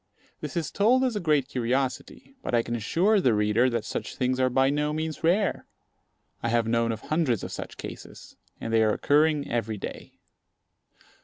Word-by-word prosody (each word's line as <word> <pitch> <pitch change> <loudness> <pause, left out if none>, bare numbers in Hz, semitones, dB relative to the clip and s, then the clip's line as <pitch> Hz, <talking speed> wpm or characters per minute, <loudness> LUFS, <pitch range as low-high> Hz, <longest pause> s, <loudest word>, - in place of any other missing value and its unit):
This - - -5
is 165 - -2
told 240 +6 +3
as 250 -4 0
a - - 0
great 150 -7 +1
curiosity; 130 - -2
but 125 - -1
I 115 - +3
can 120 - -3
assure 185 - +2
the 125 -9 +3
reader 105 +4 +3
that 115 -3 -2
such - - -5
things 130 0 0
are 130 0 +3
by 130 +2 +3
no 150 +1 0
means 155 +1 -4
rare. 185 +3 +1 0.7
I 115 - -1
have 115 -1 +1
known 115 0 +1
of 110 - -5
hundreds 155 - 0
of - - -5
such - - -7
cases; - - -10 0.2
and 115 - -4
they 115 - +4
are 110 -1 +3
occurring 150 0 +2
every 115 -2 -2
day. - - -8
130 Hz, 185 wpm, -26 LUFS, 115-160 Hz, 0.7 s, they